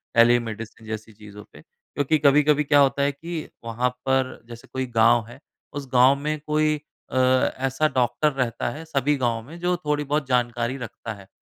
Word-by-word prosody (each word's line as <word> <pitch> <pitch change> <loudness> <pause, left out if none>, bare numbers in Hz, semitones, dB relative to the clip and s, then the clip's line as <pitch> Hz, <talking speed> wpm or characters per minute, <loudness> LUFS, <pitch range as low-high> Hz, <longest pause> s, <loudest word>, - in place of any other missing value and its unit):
Telemedicine 115 -1 +2
जैसी 110 0 -6
चीज़ों 105 -1 -12
पे - - -14
क्योंकि 145 +2 -2
कभी-कभी 150 +1 +4
क्या 145 0 +4
होता 140 0 +3
है 140 0 +2
कि 160 +3 -6 0.2
वहाँ 120 +2 0 0.2
पर 130 -1 +2 0.2
जैसे 115 0 -11
कोई 130 0 -1
गाँव 115 0 +5
है 120 +3 -13 0.3
उस 140 -1 -6
गाँव 125 +2 +6
में 150 +2 -3
कोई 155 0 +2 0.4
अ, - - -6
ऐसा 130 +2 +2
डॉक्टर 125 +4 +2
रहता 125 -4 -1
है 155 - -7
सभी 145 -2 +1
गाँव 120 -3 0
में 165 +4 -10
जो 180 +1 +1
थोड़ी-बहुत 150 -1 -1
जानकारी 120 0 0
रखता 115 -2 -7
है। 100 -2 -14
130 Hz, 175 wpm, -24 LUFS, 115-145 Hz, 0.4 s, गाँव